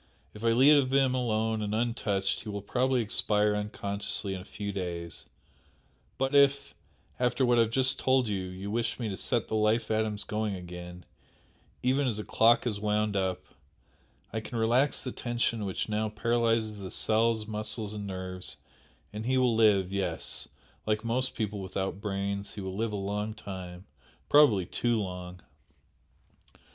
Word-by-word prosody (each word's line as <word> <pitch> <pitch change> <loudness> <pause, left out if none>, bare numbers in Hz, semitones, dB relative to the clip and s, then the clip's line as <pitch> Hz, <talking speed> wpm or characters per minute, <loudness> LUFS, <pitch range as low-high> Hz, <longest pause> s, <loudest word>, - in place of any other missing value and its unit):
If 105 - -10
I - - +2
leave 135 +2 +6
him 135 -1 +3
alone 110 -3 0
and 105 0 -1
untouched 105 -4 0
he 110 - -8
will 100 -1 -4
probably 130 +3 +1
expire 105 0 +2
unconsciously 100 -1 -2
in 95 - -5
a - - -12
few 100 0 -5
days, 85 -3 -5 0.9
but 135 +1 0
if 140 0 +4 0.5
after 125 +1 +2
what 120 -1 +4
I - - +7
have 115 - +2
just 130 +2 +2
told 130 -2 +3
you 100 -3 -1
you 95 +2 -6
wish 115 0 -1
me 115 -3 -2
to 95 - -3
set 115 +4 0
the - - -6
life 110 +1 +2
atoms 110 -1 0
going 105 -1 -2
again, 90 0 -9 0.8
even 135 +2 +2
as 115 -4 -1
a 105 - -3
clock 115 +3 +4
is 105 -4 -1
wound 105 0 0
up, 95 -2 -1 0.9
I 110 - -1
can 115 +2 -6
relax 120 +5 +2
the 125 - -4
tension 120 -3 -1
which 95 - -2
now 110 0 -1
paralyses 115 0 +1
the 95 -2 -7
cells, 110 +1 +1
muscles 105 0 -4
and 105 -1 -5
nerves, 95 -1 -5 0.6
and 110 +2 -5
he 130 0 +2
will 125 -2 +3
live 100 -4 +4
yes! 95 -4 -1 0.4
like 110 +1 0
most 130 +3 0
people 105 -2 -2
without 95 +1 -3
brains 100 -1 -3
he 105 - -5
will 95 0 -5
live 110 +2 -1
a - - -3
long 105 +2 -3
time 95 -3 -8 0.4
probably 120 -11 +6
too 120 +5 0
long!" 90 -2 -6
105 Hz, 165 wpm, -29 LUFS, 100-115 Hz, 0.9 s, I